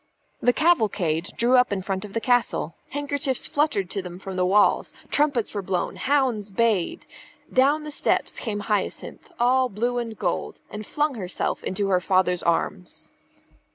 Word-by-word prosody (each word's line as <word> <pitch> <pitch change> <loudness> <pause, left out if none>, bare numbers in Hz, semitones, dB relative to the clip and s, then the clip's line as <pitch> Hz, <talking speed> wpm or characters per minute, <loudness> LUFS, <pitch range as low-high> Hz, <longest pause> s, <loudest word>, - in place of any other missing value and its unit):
The 245 - +4
cavalcade 205 - +2
drew 245 +2 +4
up 250 -2 +4
in 190 -2 -2
front 190 0 -3
of 200 - -11
the 230 - 0
castle. 245 -8 +1 0.2
Handkerchiefs 285 -2 -2
fluttered 290 - +1
to 195 - -2
them 180 -1 -8
from 190 0 -7
the 180 0 +1
walls; 205 +2 +3 0.2
trumpets 285 -6 +1
were 205 - -2
blown; 185 -2 -2
hounds 255 -7 0
bayed. 210 -4 0 0.5
Down 285 +4 +3
the 300 - -6
steps - - 0
came 210 -4 -3
Hyacinth, 210 - -3
all 255 +1 +3
blue 240 +4 -1
and 230 -3 -5
gold, 180 -4 -2
and 210 0 -7
flung 295 0 0
herself 190 -6 -3
into 195 +1 -1
her 180 -2 +3
father's 185 -1 +2
arms. 165 - -2
215 Hz, 160 wpm, -24 LUFS, 190-260 Hz, 0.5 s, The